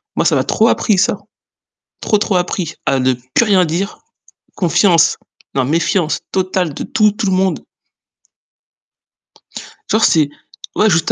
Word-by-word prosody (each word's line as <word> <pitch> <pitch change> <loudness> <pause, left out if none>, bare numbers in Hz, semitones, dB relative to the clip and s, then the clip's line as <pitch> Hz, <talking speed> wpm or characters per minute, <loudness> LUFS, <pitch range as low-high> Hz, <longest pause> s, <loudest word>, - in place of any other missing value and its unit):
Moi - - 0
ça - - +3
m'a - - +1
trop 225 - +2
appris 215 -3 +1
ça, 195 +1 +1 0.8
trop, 215 - +1
trop 205 -1 -1
appris, 180 -2 -2
à 135 -2 +1
ne 130 0 +2 0.2
plus 235 - +3
rien 195 -4 +3
dire, 175 +6 -3 0.6
confiance, 170 -1 +3 0.4
non 130 - +2
méfiance 165 +3 0
totale 185 -3 -1
de 140 - -6
tout, 215 -1 +2
tout 210 0 -3
le 190 - +1
monde. 185 0 0 2.3
Genre 220 +1 +2
c'est 155 -4 +3 0.5
ouais 215 - +4
juste 165 -3 +1
185 Hz, 145 wpm, -16 LUFS, 160-205 Hz, 2.3 s, ouais